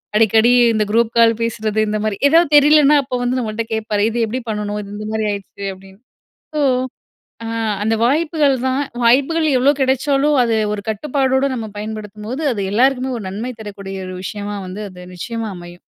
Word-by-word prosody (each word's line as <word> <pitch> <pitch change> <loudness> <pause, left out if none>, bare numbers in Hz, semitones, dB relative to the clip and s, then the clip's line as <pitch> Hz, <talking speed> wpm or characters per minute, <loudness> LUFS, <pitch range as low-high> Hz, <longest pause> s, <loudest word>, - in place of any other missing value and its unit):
அடிக்கடி 225 +2 +4 0.2
இந்த 215 -1 +1
group 230 +1 +2
call 230 0 +6
பேசுறது, 220 -2 -1
இந்தமாரி. 215 0 -1
எதாவது 330 0 +4
தெரிலனா, 295 0 +6
அப்போ 255 -1 -3
வந்து 250 +1 0
நம்மள்ட்ட 225 -1 -3
கேட்பாரு. 215 -2 -1
"இது 230 - -4
எப்படி 245 +4 -3
பண்ணணும்? 210 -1 -3
இது 200 - -10
இந்த 215 - -6
மாரி 220 0 -1
ஆயிருச்சு." 200 0 -7
அப்படீன்னு. 190 +1 -16 0.6
சோ, - - +1 0.9
அ - - -4 0.4
அந்த 225 +1 +1
வாய்ப்புகள் 300 +1 +2
தான். 265 +2 0 0.2
வாய்ப்புகள் 280 +7 +3
எவ்வளோ 275 +3 +4
கெடைச்சாலும், 275 +2 +2
அது 230 -2 +1 0.2
ஒரு 205 -1 -5
கட்டுப்பாடோட 265 +4 0
நம்ம 225 -3 -5
பயன்படுத்தும்போது, 215 +5 -6
அது 205 -3 -3
எல்லாருக்குமே 260 +2 +2
ஒரு 205 - -8
நன்மை 225 +6 -5
தரக்கூடிய 195 -2 -7
ஒரு 185 - -6
விஷயமா 205 +1 -5
வந்து 190 +3 -7
அது 180 -1 -12
நிச்சயமா 225 +4 -4
அமையும். 175 0 -12
225 Hz, 165 wpm, -18 LUFS, 210-265 Hz, 0.9 s, call